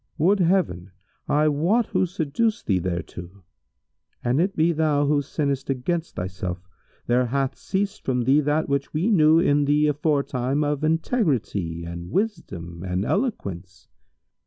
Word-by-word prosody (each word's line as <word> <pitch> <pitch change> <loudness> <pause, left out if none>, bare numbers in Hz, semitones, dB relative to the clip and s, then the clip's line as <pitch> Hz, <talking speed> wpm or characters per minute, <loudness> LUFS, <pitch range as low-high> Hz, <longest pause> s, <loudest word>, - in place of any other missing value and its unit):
Would 190 +6 +3
Heaven 170 - +1 0.4
I 150 +1 +3
wot 170 +11 +2
who 185 - 0
seduced 190 +6 -1
thee 95 -3 +2
thereto! 90 +1 -6 0.8
An 125 +4 +1
it 195 +4 +1
be 165 +2 +3
thou 150 -3 +1
who 145 0 +2
sinnest 140 -1 -2
against 160 +6 -2
thyself, 90 0 -4 0.5
there 125 +1 +2
hath 135 +2 -1
ceased 200 +2 -3
from 125 -2 0
thee 135 +5 +4
that 150 +2 0
which 140 +1 -2
we 180 +9 +1
knew 160 -4 +5
in 145 -4 +3
thee 150 +1 +3
aforetime 145 -2 0
of 145 0 -1
integrity 140 - 0
and 85 +1 -7
wisdom 90 - -3
and 90 +1 -2
eloquence. 95 - -3
145 Hz, 140 wpm, -24 LUFS, 100-165 Hz, 0.8 s, knew